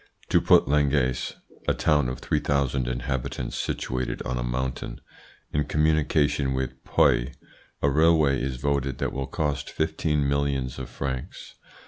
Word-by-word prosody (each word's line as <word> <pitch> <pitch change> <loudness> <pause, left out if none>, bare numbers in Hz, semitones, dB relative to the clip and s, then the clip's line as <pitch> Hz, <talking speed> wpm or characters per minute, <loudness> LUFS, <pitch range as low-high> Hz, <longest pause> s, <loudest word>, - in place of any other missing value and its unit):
To - - +4
put - - +5
Langayes 70 -3 +1 0.3
(a - - +2
town 75 -5 +2
of 65 - -6
3,000 70 -4 0
inhabitants, 65 +1 -3
situated 65 0 -2
on 65 - -2
a - - -1
mountain) 65 +1 -3 0.5
in 75 -1 +1
communication 75 -2 +2
with 65 0 -4
Puy, - - +3 0.5
a 70 - +5
railway 75 -3 +4
is 65 -1 -2
voted 70 0 -1
that - - -2
will 65 0 -3
cost 75 -2 -2
15 80 -2 0
millions 70 -2 -1
of 65 -1 -6
francs. 65 0 -5
70 Hz, 135 wpm, -26 LUFS, 65-75 Hz, 0.5 s, put